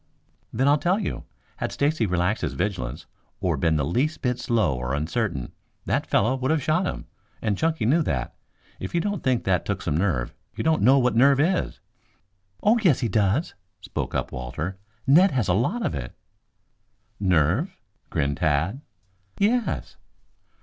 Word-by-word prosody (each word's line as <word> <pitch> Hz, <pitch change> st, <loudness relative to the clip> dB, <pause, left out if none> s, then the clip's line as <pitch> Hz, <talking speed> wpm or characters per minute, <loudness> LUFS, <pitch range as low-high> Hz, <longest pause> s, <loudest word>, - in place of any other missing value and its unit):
"Then 130 Hz, +5 st, +1 dB
I'll 145 Hz, +1 st, +4 dB
tell 180 Hz, +5 st, +2 dB
you. 210 Hz, -, -4 dB, 0.3 s
Had -, -, -3 dB
Stacy 140 Hz, -6 st, +1 dB
relaxed 90 Hz, +3 st, 0 dB
his -, -, -2 dB
vigilance, 100 Hz, -3 st, -3 dB, 0.3 s
or 90 Hz, -3 st, 0 dB
been 80 Hz, +3 st, +1 dB
the 75 Hz, -2 st, +1 dB
least 130 Hz, -, -1 dB
bit 125 Hz, -1 st, 0 dB
slow 110 Hz, -, +1 dB
or 60 Hz, +2 st, -2 dB
uncertain, 80 Hz, -, -2 dB, 0.3 s
that -, -, 0 dB
fellow 115 Hz, +6 st, +2 dB
would 130 Hz, 0 st, -2 dB
have 155 Hz, -3 st, +1 dB
shot 165 Hz, +6 st, +1 dB
him, -, -, -5 dB, 0.3 s
and 105 Hz, -, 0 dB
Chunky 160 Hz, 0 st, 0 dB
knew 150 Hz, +9 st, +4 dB
that. 65 Hz, -, -2 dB, 0.5 s
If 95 Hz, -, -5 dB
you -, -, +3 dB
don't 205 Hz, +1 st, -2 dB
think 130 Hz, -3 st, +1 dB
that 90 Hz, -3 st, +1 dB
took 100 Hz, -2 st, -3 dB
some 75 Hz, -, -1 dB
nerve 80 Hz, -9 st, 0 dB, 0.2 s
you -, -, -3 dB
don't 160 Hz, -1 st, +2 dB
know 130 Hz, +6 st, +6 dB
what 125 Hz, -3 st, +2 dB
nerve 135 Hz, +3 st, +5 dB
is." 180 Hz, +5 st, +1 dB, 0.8 s
"Oh, 225 Hz, +3 st, +4 dB
yes 170 Hz, -, +3 dB
he 120 Hz, -, 0 dB
does," 105 Hz, -, +1 dB, 0.3 s
spoke -, -, -4 dB
up -, -, -1 dB
Walter. 75 Hz, +10 st, -5 dB, 0.3 s
"Ned 175 Hz, +8 st, +6 dB
has 120 Hz, -7 st, +1 dB
a 90 Hz, -, +3 dB
lot 175 Hz, -, 0 dB
of -, -, -1 dB
it." 65 Hz, -4 st, -5 dB, 1.0 s
"Nerve?" 95 Hz, -, +1 dB, 0.3 s
grinned 70 Hz, -3 st, -1 dB
Tad. 85 Hz, -, 0 dB, 0.6 s
"Yes." 230 Hz, +3 st, 0 dB
110 Hz, 170 wpm, -25 LUFS, -, 1.0 s, know